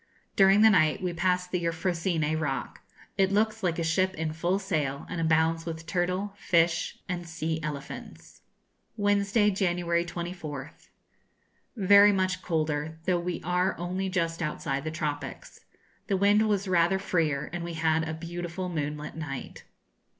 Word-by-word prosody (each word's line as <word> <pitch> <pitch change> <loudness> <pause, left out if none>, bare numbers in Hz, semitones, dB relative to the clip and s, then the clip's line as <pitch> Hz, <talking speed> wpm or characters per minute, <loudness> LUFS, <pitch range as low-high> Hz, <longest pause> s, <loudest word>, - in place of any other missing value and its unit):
During 195 +1 +6
the 220 - +8
night 155 -3 +3
we 180 -1 -1
passed 180 +1 0
the 180 - 0
Euphrosyne 165 -1 0
rock. 135 -5 -3 0.4
It 195 0 +4
looks 220 +2 +1
like 175 -3 0
a 170 - -1
ship 185 +3 +1
in 160 -2 -2
full 175 +4 0
sail, 155 -9 -2
and 175 - -4
abounds 160 0 +2
with 165 0 -5
turtle, 185 +3 -1
fish, 170 -1 +1
and 175 -1 -4
sea 160 -1 -2
elephants. 145 -2 -7 0.6
Wednesday, 205 +1 +3
January 175 -3 0
24th. 165 -4 -7 0.9
Very 200 -1 +7
much 185 -1 0
colder, 155 -2 -1
though 180 -2 +2
we 175 0 -4
are 180 +2 +1
only 185 +2 -2
just 170 -3 -1
outside 140 -2 -2
the - - -1
tropics. 155 -2 -5 0.4
The 195 - +1
wind 205 +3 +4
was 200 -1 0
rather 175 +1 +3
freer, 155 -7 -1
and 175 -1 -3
we 170 0 -5
had 160 0 +2
a 160 - -3
beautiful 175 +2 -5
moonlight 150 -2 -4
night. 150 -4 -7
175 Hz, 150 wpm, -28 LUFS, 160-185 Hz, 0.9 s, the